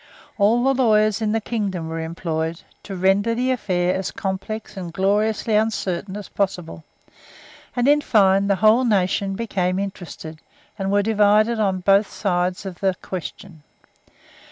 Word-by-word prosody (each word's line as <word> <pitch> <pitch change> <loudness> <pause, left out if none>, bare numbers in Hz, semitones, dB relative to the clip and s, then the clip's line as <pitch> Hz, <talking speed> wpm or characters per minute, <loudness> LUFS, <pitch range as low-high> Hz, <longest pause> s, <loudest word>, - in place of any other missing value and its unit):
All 225 +4 +3
the 270 +1 +3
lawyers 215 -4 +3
in 215 -1 0
the 225 - +1
kingdom 200 -7 -3
were 165 0 -4
employed, 160 0 -3 0.2
to 195 - -7
render 195 +5 +2
the 255 +2 0
affair 180 -7 0
as 190 -1 -2
complex 195 +4 -5
and 180 -3 -6
gloriously 210 +4 0
uncertain 205 -3 -1
as 205 - -8
possible; 180 -5 -3 0.9
and, 245 +1 +1
in 295 +1 +5
fine, 195 -5 +3
the 200 - +3
whole 220 +5 +4
nation 195 -3 +1
became 190 -4 -1
interested, 175 -5 -6 0.4
and 195 0 -1
were 205 0 +3
divided 215 +1 +3
on 190 -3 0
both 195 +2 +3
sides 180 -1 -1
of 185 -2 -7
the 190 -2 +1
question. 180 -2 -7
195 Hz, 150 wpm, -22 LUFS, 185-215 Hz, 0.9 s, in